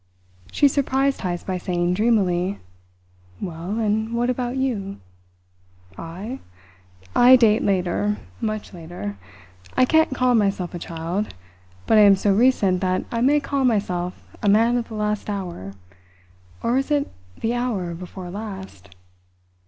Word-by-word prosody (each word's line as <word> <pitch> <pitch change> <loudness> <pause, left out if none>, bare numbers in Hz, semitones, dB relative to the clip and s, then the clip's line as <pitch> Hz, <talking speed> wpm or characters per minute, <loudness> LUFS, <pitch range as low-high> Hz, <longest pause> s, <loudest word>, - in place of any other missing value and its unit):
She 290 - +4
surprised 275 0 +1
Heyst 175 -2 -3
by 185 -1 -2
saying 175 -1 0
dreamily: 195 -3 +1 0.8
"Well 175 +4 -4
and 220 +1 0
what 240 +1 +1
about 250 +1 -3
you?" 210 -7 -2 1.0
"I? 190 - -7 0.8
I 250 +1 +8
date 225 -3 +4
later 195 +2 0 0.2
much 215 -2 -3
later. 160 - -7 0.6
I 255 - +6
can't 315 -1 +3
call 255 -1 +3
myself 195 -5 +1
a 175 - -5
child, 170 - -4 0.5
but 220 - +5
I - - +8
am 200 -1 +8
so 195 +1 +2
recent 200 -5 +3
that 185 -1 0
I 230 - -1
may 285 +4 +4
call 280 -1 -1
myself 185 -7 0 0.2
a 205 - +2
man 225 +4 +4
of 240 -1 -1
the 220 - -8
last 210 0 -2
hour 175 - -5 0.9
or 245 +3 +2
is 270 - -3
it 290 -1 +1 0.3
the 225 +1 0
hour 225 -8 -2
before 180 +1 -8
last? 190 - -8
210 Hz, 140 wpm, -23 LUFS, 180-240 Hz, 1.0 s, I